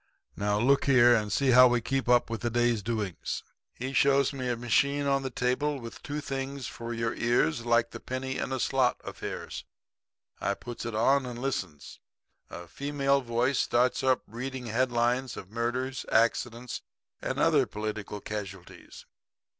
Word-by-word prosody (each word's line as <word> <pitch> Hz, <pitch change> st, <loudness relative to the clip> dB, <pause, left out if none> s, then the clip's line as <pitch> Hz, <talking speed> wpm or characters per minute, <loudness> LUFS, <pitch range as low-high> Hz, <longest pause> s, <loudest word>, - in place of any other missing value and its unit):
Now, 105 Hz, 0 st, 0 dB
look 135 Hz, +5 st, +3 dB
here, 120 Hz, -3 st, +6 dB
and 105 Hz, -3 st, +1 dB
see 135 Hz, +5 st, +2 dB
how 125 Hz, +1 st, +9 dB
we 120 Hz, 0 st, +2 dB
keep 130 Hz, +2 st, -2 dB
up 125 Hz, 0 st, +5 dB
with 115 Hz, -, -3 dB
the 120 Hz, -, 0 dB
day's 120 Hz, -2 st, +1 dB
doings.' 105 Hz, -4 st, -3 dB, 0.3 s
"He 130 Hz, +2 st, -6 dB
shows 140 Hz, +1 st, +3 dB
me 130 Hz, -2 st, -3 dB
a 120 Hz, -, -1 dB
machine 140 Hz, +5 st, +1 dB
on 135 Hz, -1 st, +1 dB
a 130 Hz, -, -2 dB
table 130 Hz, +4 st, 0 dB
with 115 Hz, -2 st, -9 dB
two 150 Hz, +1 st, -4 dB
things 135 Hz, -1 st, -4 dB
for 115 Hz, 0 st, -6 dB
your 115 Hz, -1 st, -1 dB
ears 120 Hz, -2 st, +1 dB
like 115 Hz, 0 st, +3 dB
the -, -, -7 dB
penny 130 Hz, +1 st, -4 dB
in -, -, -2 dB
the 130 Hz, 0 st, -2 dB
slot 130 Hz, -1 st, +1 dB
affairs. -, -, -6 dB, 0.8 s
I 100 Hz, -, 0 dB
puts 120 Hz, +1 st, -7 dB
it 115 Hz, -, -4 dB
on 130 Hz, +4 st, +3 dB
and 120 Hz, -1 st, -6 dB
listens. 95 Hz, -, -4 dB, 0.5 s
A 85 Hz, 0 st, -9 dB
female 140 Hz, +3 st, 0 dB
voice 120 Hz, +2 st, 0 dB
starts 125 Hz, +1 st, +2 dB
up 130 Hz, -1 st, +2 dB
reading 125 Hz, +3 st, -6 dB
headlines 120 Hz, +2 st, 0 dB
of 95 Hz, -, -9 dB
murders, 120 Hz, +3 st, -2 dB
accidents 115 Hz, +1 st, +1 dB, 0.4 s
and -, -, -3 dB
other -, -, +3 dB
political 105 Hz, -1 st, -5 dB
casualities. 100 Hz, -4 st, -8 dB
120 Hz, 165 wpm, -28 LUFS, 115-135 Hz, 0.8 s, how